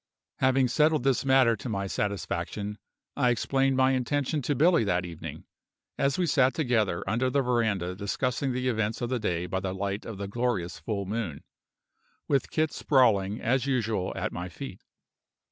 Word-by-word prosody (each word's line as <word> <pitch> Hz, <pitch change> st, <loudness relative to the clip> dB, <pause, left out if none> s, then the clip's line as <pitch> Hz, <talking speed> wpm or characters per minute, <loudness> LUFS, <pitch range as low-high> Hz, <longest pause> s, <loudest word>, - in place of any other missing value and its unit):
Having 130 Hz, -1 st, +3 dB
settled 150 Hz, +2 st, +3 dB
this 135 Hz, -3 st, +2 dB
matter 130 Hz, -3 st, +4 dB
to 115 Hz, +4 st, -7 dB
my 100 Hz, -2 st, -2 dB
satisfaction, 100 Hz, +1 st, -3 dB, 0.4 s
I 125 Hz, -3 st, +3 dB
explained 135 Hz, +2 st, +1 dB
my 130 Hz, 0 st, +4 dB
intention 140 Hz, +3 st, 0 dB
to 145 Hz, +3 st, -1 dB
Billy 165 Hz, +1 st, +4 dB
that 90 Hz, -3 st, 0 dB
evening, 85 Hz, -2 st, -8 dB, 0.5 s
as 140 Hz, 0 st, +1 dB
we 180 Hz, -, +2 dB
sat 135 Hz, -4 st, +3 dB
together 110 Hz, -, +1 dB
under 125 Hz, +3 st, +1 dB
the 140 Hz, +1 st, +1 dB
veranda 110 Hz, -8 st, 0 dB
discussing 125 Hz, +7 st, -1 dB
the 125 Hz, +1 st, -1 dB
events 110 Hz, -2 st, -1 dB
of 120 Hz, +1 st, -2 dB
the 125 Hz, -, 0 dB
day 90 Hz, -5 st, -1 dB
by 95 Hz, +1 st, -2 dB
the 95 Hz, 0 st, -3 dB
light 100 Hz, +1 st, -3 dB
of 110 Hz, -4 st, -7 dB
a 100 Hz, -, -3 dB
glorious 100 Hz, -5 st, -2 dB
full 100 Hz, -3 st, -3 dB
moon, 100 Hz, -7 st, -4 dB, 0.8 s
with 140 Hz, -2 st, +1 dB
Kit 155 Hz, -1 st, 0 dB
sprawling 110 Hz, -7 st, +2 dB
as 130 Hz, +3 st, +1 dB
usual 115 Hz, -8 st, 0 dB
at -, -, -2 dB
my 90 Hz, +1 st, -5 dB
feet. 100 Hz, 0 st, -8 dB
120 Hz, 170 wpm, -28 LUFS, 100-135 Hz, 0.8 s, matter